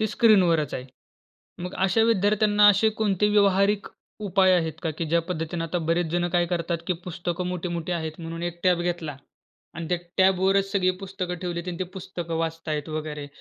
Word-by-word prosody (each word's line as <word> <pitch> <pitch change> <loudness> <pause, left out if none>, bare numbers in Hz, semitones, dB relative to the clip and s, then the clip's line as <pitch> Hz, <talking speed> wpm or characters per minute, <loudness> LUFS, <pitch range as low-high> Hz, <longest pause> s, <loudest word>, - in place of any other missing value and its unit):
ते 220 - +2
स्क्रीनवरच 180 - +4
आहे. 125 - -4 0.8
मग 180 - -5
अशा 220 +4 +3
विद्यार्थ्यांना 210 -1 +4
असे 205 +2 +5
कोणते 210 -1 +2
व्यावहारिक 200 0 +3 0.4
उपाय 190 0 +4
आहेत 160 -2 0
का, 160 - -1
की 160 +2 -4
ज्या 170 +2 +2
पद्धतीने 165 -1 -3
आता 170 +2 -2
बरेच 170 0 +2
जण 175 0 +1
काय 175 0 +3
करतात, 170 -1 -1
की 180 - +1
पुस्तकं 175 0 -3
मोठी-मोठी 175 -1 -3
आहेत 160 -2 -2
म्हणून 165 0 -6
एक 175 0 -4
टॅब 180 -2 +3
घेतला 170 -5 -3 0.6
आणि 165 -1 -5
त्या 180 - +1 0.2
टॅबवरच 190 +1 +3
सगळी 185 -2 +3
पुस्तकं 185 -2 -4
ठेवली 175 -2 -3
आणि 175 -1 -4
ती 185 - -1
पुस्तकं 175 -3 -5
वाचत 165 0 -3
आहेत 150 0 -2
वगैरे 155 -2 -4
175 Hz, 180 wpm, -25 LUFS, 165-190 Hz, 0.8 s, असे